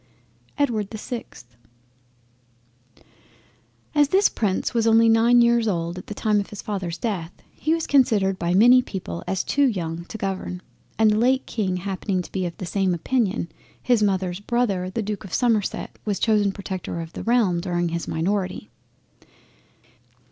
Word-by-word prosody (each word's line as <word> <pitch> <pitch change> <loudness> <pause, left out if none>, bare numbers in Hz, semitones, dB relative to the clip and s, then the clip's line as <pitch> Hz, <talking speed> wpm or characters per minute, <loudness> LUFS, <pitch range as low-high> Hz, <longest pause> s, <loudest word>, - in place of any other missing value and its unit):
EDWARD 225 -9 0
the 220 - -7
6th 220 - -7 2.5
As 295 -2 +4
this 390 +4 +4
prince 195 -4 -1
was 230 -1 +1
only 225 0 +5
nine 230 +2 +5
years 235 -1 +3
old 170 -2 -2
at - - -12
the 210 - -6
time 210 0 +1
of 200 - -4
his 210 - -8
Father's 185 -5 -3
death, 180 -7 -3 0.2
he 315 +2 0
was 330 - -3
considered 205 -9 +3
by 175 +1 0
many 245 +5 +7
people 130 - -6
as 190 - -1
too 285 -1 +2
young 170 -6 -3
to 220 - -8
govern, 190 -3 -4 0.3
and 220 -1 +4
the 210 - +1
late 260 +3 +2
King 190 -5 -2
happening 190 0 -2
to - - -13
be 185 -2 -1
of 170 - -8
the 185 - -5
same 190 0 0
opinion, 205 -1 0 0.3
his 245 -3 +2
mother's 190 -3 0
Brother 205 -5 0
the 220 +4 -3
Duke 205 -1 -4
of 190 - -4
Somerset 230 -5 0
was 205 -3 -1
chosen 210 -3 +2
Protector 190 -3 -5
of 165 0 -7
the - - -6
realm 225 -7 +2
during 175 -1 -1
his 170 0 -4
minority. 185 +4 -2
200 Hz, 165 wpm, -23 LUFS, 180-230 Hz, 2.5 s, many